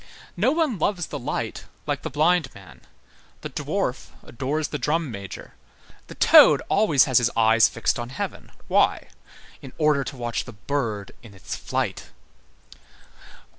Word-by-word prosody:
No 215 +9 +2
one 305 - 0
loves 175 0 0
the 145 - -6
light 120 - -4 0.2
like - - -2
the - - -5
blind 160 +4 +2
man. 80 -11 -15 0.6
The - - -7
dwarf - - -3 0.2
adores 140 +5 -3
the 150 - -4
drum 150 +2 -1
major. 100 -3 -9 0.5
The - - -11
toad - - +7
always 195 -10 +4
has 130 -3 +3
his 120 -1 +1
eyes 115 0 +5
fixed 115 - -1
on 120 0 -5
heaven. 130 - -6 0.2
Why? - - +2 0.5
In 130 - -11
order 150 -3 +2
to 135 - -7
watch 120 -1 -3
the 120 - -10
bird 105 -2 -3
in 110 -5 -14
its 95 - -6
flight. - - -3
135 Hz, 150 wpm, -24 LUFS, 115-155 Hz, 0.6 s, toad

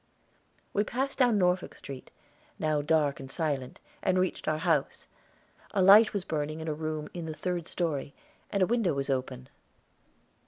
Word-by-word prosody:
_" - - -41 0.7
We 205 - +2
passed 265 +6 -3
down 245 -4 +4
Norfolk 180 -1 +1
Street, 135 -2 -9 0.5
now 155 -1 +1
dark 150 -2 +1
and 135 - -8
silent, 140 -4 -3 0.2
and 185 -1 +2
reached 185 0 -1
our 155 0 +1
house. 160 -4 0 0.7
A 195 - +3
light 210 +4 +8
was 200 -4 -3
burning 155 0 -2
in 160 - -6
a 155 - 0
room 155 0 -4
in 170 -2 -5
the 155 - -5
third 175 -1 -3
story, 145 -5 -2 0.3
and 200 -2 +1
a - - +5
window 220 -7 +1
was 140 0 -1
open. 130 -1 -3
160 Hz, 170 wpm, -29 LUFS, 145-185 Hz, 0.7 s, light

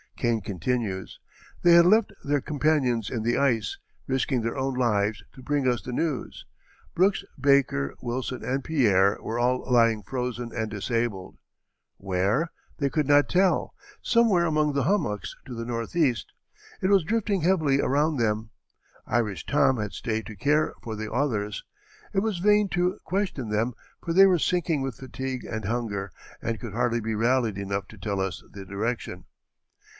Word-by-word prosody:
Kane 115 -2 +1
continues: 100 +1 -3 0.4
"They 175 -1 +7
had 170 0 +8
left 215 +4 +4
their 145 0 +1
companions 135 -7 +1
in 120 - -3
the 120 +1 +1
ice, 140 - +1 0.3
risking 130 -1 0
their 115 +4 -3
own 135 0 -1
lives 105 -4 +1
to 130 - -13
bring 145 -2 0
us 120 -2 +1
the 125 - -6
news; 145 +1 -3 0.5
Brooks, 195 +3 +3 0.2
Baker, 135 - +2
Wilson, 125 +1 -3
and 135 +1 -1
Pierre, 100 -11 +3
were 115 +2 -3
all 125 +1 +1
lying 115 -3 +4
frozen 125 +1 -4
and 110 -2 -2
disabled. 110 -2 -2 0.6
Where? 100 - 0 0.3
They 140 -2 0
could 150 0 0
not 145 0 +5
tell; 185 0 +2 0.3
somewhere 225 -7 +3
among 155 -2 +1
the 140 -1 +1
hummocks 125 - -1
to 125 - -7
the 115 0 -4
northeast; 120 +3 -1 0.5
it 185 - +2
was 195 -3 +5
drifting 205 0 0
heavily 155 -6 +2
around 150 +3 +1
them. 110 -1 -1 0.6
Irish 110 -6 -1
Tom 130 - +3
had 105 -2 -4
stayed 110 -2 -3
to 110 - -8
care 150 +9 +1
for 110 -2 -5
the 110 0 -5
others. 105 -7 -1 0.5
It 195 - +2
was 210 -3 -1
vain 210 +1 +4
to 180 +1 0
question 180 - -2
them, 110 +4 0 0.3
for 165 - -2
they 195 +2 +8
were 180 -3 +3
sinking 165 -3 +1
with 135 -3 -4
fatigue 130 -1 -5
and 110 -2 -5
hunger, 100 -4 -2 0.3
and 115 -2 -2
could - - -7
hardly 120 0 0
be 110 0 -2
rallied 115 -2 +1
enough 100 0 -3
to 110 - -13
tell 100 -1 -2
us 95 -1 -3
the 100 -1 -9
direction." 100 -2 -4
125 Hz, 165 wpm, -26 LUFS, 110-150 Hz, 0.6 s, had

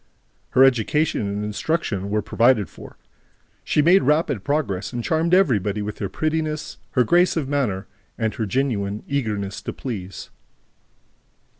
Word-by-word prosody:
Her 130 - +9
education 135 -1 +2
and 100 +1 -3
instruction 105 - -2
were 105 0 0
provided 115 -4 +2
for. - - -13 0.7
She 150 - +2
made 185 +5 +6
rapid 150 - +1
progress 140 -10 -1
and 120 -2 -4
charmed 165 +4 +2
everybody 105 - +2
with 105 0 -6
her 100 - -2
prettiness, 155 +3 -2
her 125 - +4
grace 175 +8 +3
of 150 -5 -1
manner 125 -9 -1 0.3
and 110 -2 -1
her 110 - -3
genuine 105 -4 -1
eagerness 105 -8 -2
to - - -4
please. 100 -7 -6
120 Hz, 140 wpm, -22 LUFS, 105-150 Hz, 0.7 s, Her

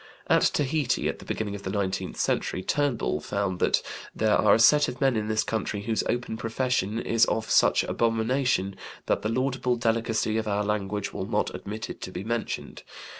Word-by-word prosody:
At - - +4
Tahiti 145 -2 +1
at - - -3
the - - -12
beginning 105 -2 -3
of 100 - -6
the 95 - -5
nineteenth 95 -1 -2
century, 95 - -1
Turnbull 135 - 0
found 100 -1 -2
that - - +2 0.3
"there 110 -1 +3
are - - +5
a - - +1
set 145 +5 +6
of 125 - -6
men 135 -3 +3
in 105 -1 -1
this 110 0 +1
country 110 -2 -2
whose 110 +1 0
open 120 -2 -2
profession 115 -2 -1
is 115 -1 +3
of 110 0 -2
such - - +4
abomination 115 -3 0 0.3
that - - +1
the 110 - -1
laudable 130 +1 0
delicacy 115 -1 0
of 110 - -4
our 105 0 0
language 105 -1 -2
will 95 - -4
not 105 -1 0
admit 110 +2 -6
it - - -9
to 95 - -6
be 90 +1 -5
mentioned. 115 +1 -4
110 Hz, 190 wpm, -26 LUFS, 105-120 Hz, 0.3 s, set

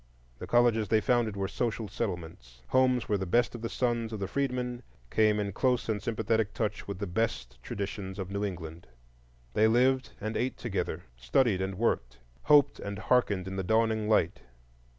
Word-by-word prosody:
The - - -6
colleges 120 -3 +3
they 110 -1 +3
founded 115 -2 +1
were 95 0 -1
social 115 +1 -2
settlements; 80 - -6
homes 130 -2 +3
where 105 -2 +1
the 95 - -3
best 120 +6 +2
of 120 - -7
the 115 - -3
sons 120 -2 -1
of 110 - -4
the 95 - -2
freedmen 125 0 -2 0.3
came 110 -1 +3
in 100 -1 -1
close 125 +1 +1
and 105 -2 -1
sympathetic 110 -1 0
touch 105 0 -2
with 100 -2 -4
the 100 - -3
best 90 - -2
traditions 100 - -5
of 95 -1 -5
New 100 +1 -2
England. 85 -5 -6 0.7
They 110 +7 +4
lived 125 -1 +2
and 110 +2 -4
ate 130 +2 -1
together, - - -3
studied 100 - +2
and 95 0 -2
worked, 60 - -1 0.3
hoped 145 -2 +5
and 100 0 -5
harkened 105 -5 +1
in 95 0 -5
the 95 - -1
dawning 110 +1 +1
light. 110 - +2
110 Hz, 180 wpm, -29 LUFS, 95-120 Hz, 0.7 s, hoped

